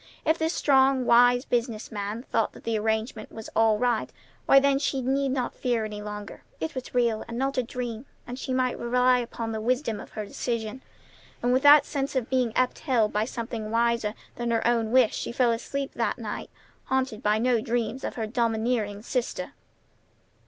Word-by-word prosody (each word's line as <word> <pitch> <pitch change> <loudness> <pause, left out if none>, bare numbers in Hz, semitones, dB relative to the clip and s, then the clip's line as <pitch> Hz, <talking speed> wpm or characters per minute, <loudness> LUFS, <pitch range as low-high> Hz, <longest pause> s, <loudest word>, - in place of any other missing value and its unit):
If 320 +1 +2
this 320 +1 0
strong, 265 -2 +3
wise 245 +1 +5
business 235 -2 -2
man 210 +2 -4
thought 225 - 0
the 230 -1 -3
arrangement 220 +1 -2
was 220 -1 -9
all 225 -1 +4
right, 240 -1 0 0.4
why, 275 - +8
then 275 0 +2
she 275 -1 -1
need 270 +2 0
not 255 -2 -1
fear 240 -4 -1
any 210 -1 -6
longer. 210 0 -7 0.2
It 160 - -3
was 255 -1 -7
real, 235 -3 +2
and 230 0 -6
not 270 +1 0
a - - +4
dream, 245 0 -5 0.2
and 245 +1 -7
she 260 - -4
might 255 -1 0
rely 250 +1 +3
upon 230 -1 -4
the 220 -1 -3
wisdom 240 -2 0
of - - -10
her 215 -1 -4
decision. 230 +3 -4 0.6
And 245 +1 +3
with 260 - +3
that 290 +1 +8
sense 275 0 -3
of 255 -2 -1
being 255 -3 +2
upheld 250 -3 +1
by 210 +1 +1
something 230 -2 -5
wiser 230 -1 +1 0.2
than 240 0 -2
her 230 -1 0
own 230 -2 +2
wish 255 -3 +4
she - - -4
fell 240 0 +2
asleep 275 +4 -3
that - - -1
night, - - -5 0.4
haunted 260 -5 -1
by 210 +1 +2
no 235 0 +2
dreams 235 +2 -2
of - - -4
her 225 - -2
domineering 220 -2 -1
sister. 250 0 -3
240 Hz, 190 wpm, -26 LUFS, 220-255 Hz, 0.6 s, why